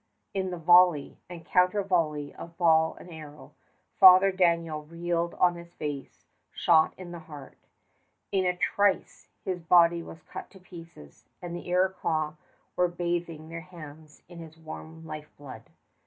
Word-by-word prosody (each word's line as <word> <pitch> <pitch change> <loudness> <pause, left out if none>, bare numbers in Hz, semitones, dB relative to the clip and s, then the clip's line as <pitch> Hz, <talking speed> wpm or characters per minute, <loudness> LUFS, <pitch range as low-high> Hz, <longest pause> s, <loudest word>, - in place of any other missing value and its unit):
In 190 -1 -2
the 180 - -5
volley 175 -2 +4
and 170 -2 -10
counter 180 +3 +2
volley 155 -6 -1
of 170 0 -11
ball 160 -2 +3
and 175 - -13
arrow, 150 -2 -12 0.5
Father 190 0 +8
Daniel 170 -4 +1
reeled 170 +2 -3
on 180 -1 +3
his 170 0 -12
face, 145 -3 -7 0.3
shot 160 -2 +3
in 180 -2 -9
the 175 - -7
heart. 150 -4 -12 0.7
In 195 -1 +1
a 180 -1 0
trice 200 +1 0 0.2
his 185 -2 -3
body 170 0 +4
was 165 0 -12
cut - - -9
to 190 - -16
pieces, 165 - -14
and 175 -1 -7
the 175 - -8
Iroquois 175 -4 0 0.4
were 180 - +2
bathing 170 -2 -4
their 165 0 -7
hands 155 -4 -13
in 175 0 -12
his 160 -1 -12
warm 160 0 -10
lifeblood. 150 -3 -10
170 Hz, 150 wpm, -27 LUFS, 160-180 Hz, 0.7 s, Father